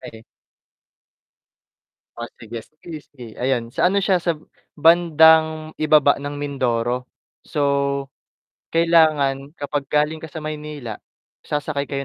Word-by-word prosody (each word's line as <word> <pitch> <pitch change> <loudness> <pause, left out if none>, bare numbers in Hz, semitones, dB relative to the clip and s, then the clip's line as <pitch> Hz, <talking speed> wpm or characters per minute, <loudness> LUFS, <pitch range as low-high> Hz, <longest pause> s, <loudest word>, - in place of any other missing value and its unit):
Eh. 110 0 -11 1.9
Oh, 120 0 -6
sige 115 0 -8
sige 155 +6 -11
sige. 130 -4 -12 0.2
Ayon, 125 -2 -1
sa 180 - +2
ano 195 - -1
siya 185 -3 +2
sa 170 -1 -1 0.4
bandang 160 -1 +4
ibaba 150 -2 +4
ng 145 0 -5
Mindoro. 125 -3 -2 0.3
So, 150 - -5 1.1
kailangan 155 -4 +2
kapag 145 -1 -4
galing 150 +2 0
ka 160 - -8
sa 155 +1 -8
Maynila, 150 -7 -6 0.4
sasakay 145 -1 -3
kayo 140 0 -3
150 Hz, 115 wpm, -21 LUFS, 135-160 Hz, 1.9 s, bandang